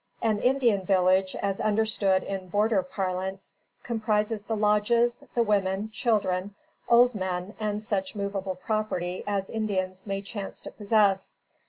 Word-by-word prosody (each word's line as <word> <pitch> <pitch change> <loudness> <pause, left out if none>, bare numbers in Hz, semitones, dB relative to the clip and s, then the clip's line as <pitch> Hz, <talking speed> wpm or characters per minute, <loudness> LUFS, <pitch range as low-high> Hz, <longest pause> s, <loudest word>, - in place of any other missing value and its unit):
An 220 -2 +2
Indian 245 -6 +2
village, 185 0 +3
as 195 -1 -2
understood 210 -3 +2
in 190 -1 -5
border 205 +2 +2
parlance, 190 +1 -4 0.3
comprises 215 -2 0
the 220 +2 -3
lodges, 215 +3 +2
the 235 - +4
women, 205 0 0
children, 200 -4 0 0.3
old 245 +1 +6
men, 185 -1 -3
and 210 -1 -2
such 195 -3 -2
movable 200 -2 -3
property 185 -3 -2
as 200 -2 -1
Indians 190 -3 -2
may 195 0 -2
chance 200 -1 -6
to - - -8
possess. 205 -2 +1
205 Hz, 135 wpm, -27 LUFS, 190-215 Hz, 0.3 s, old